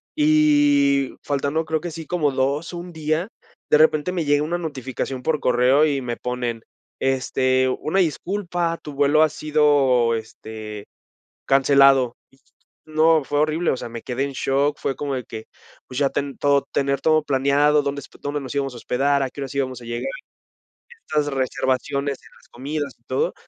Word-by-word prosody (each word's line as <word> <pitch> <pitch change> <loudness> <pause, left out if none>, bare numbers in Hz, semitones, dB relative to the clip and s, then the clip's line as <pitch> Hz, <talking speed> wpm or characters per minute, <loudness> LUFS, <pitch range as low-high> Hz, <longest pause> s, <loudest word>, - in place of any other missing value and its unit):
y 290 -2 +3
faltando, 145 +3 -1
creo 160 -1 -1
que 175 - -5
sí 160 0 -8
como 155 -4 0
2 140 +6 -1
o - - -5
1 175 0 -8
día, 155 +3 -1 0.4
de - - +6
repente 155 +2 +3
me 175 -3 -1
llega 145 0 +2
una 170 +3 -1
notificación 135 -4 -5
por 150 +1 0
correo 125 +4 +4
y 140 -3 0
me 120 -1 -3
ponen, 125 -2 -3 0.4
este: 130 0 +1
"Una 175 +5 0
disculpa, 175 0 -1
tu 150 - -8
vuelo 145 +2 +3
ha 155 - +5
sido, 145 -6 +2
este, 110 -1 -8 0.6
cancelado". 135 -2 +4 0.2
Y 135 - -26 0.5
no, 155 0 +3
fue 145 - -1
horrible, 155 +3 +1
o - - -2
sea, - - -6
me 115 0 -7
quedé 130 +2 -3
en 140 - -5
shock, 140 +2 0
fue 135 - -2
como 140 -2 -3
de 125 - -4
que, 110 0 -9 0.4
pues, 125 - -8
ya 140 -1 +3
ten 140 -1 -3
todo 140 -1 +2
tener 140 0 +1
todo 155 -1 +3
planeado, 145 +2 +3
dónde 140 0 -3
hosp 135 - -14
dónde 145 0 -3
nos 130 -2 -7
íbamos 135 -2 -1
a - - -9
hospedar, 140 +4 +1
a 130 - -2
qué - - -12
horas 135 0 -6
íbamos 130 -3 -2
a - - -11
llegar. 120 0 -3 1.0
Estas 150 -1 0
reservaciones 135 +2 -1
en - - -17
las - - -24
comidas 140 +2 -4
y - - -39
todo, 475 +3 -1
140 Hz, 180 wpm, -22 LUFS, 130-155 Hz, 1.0 s, de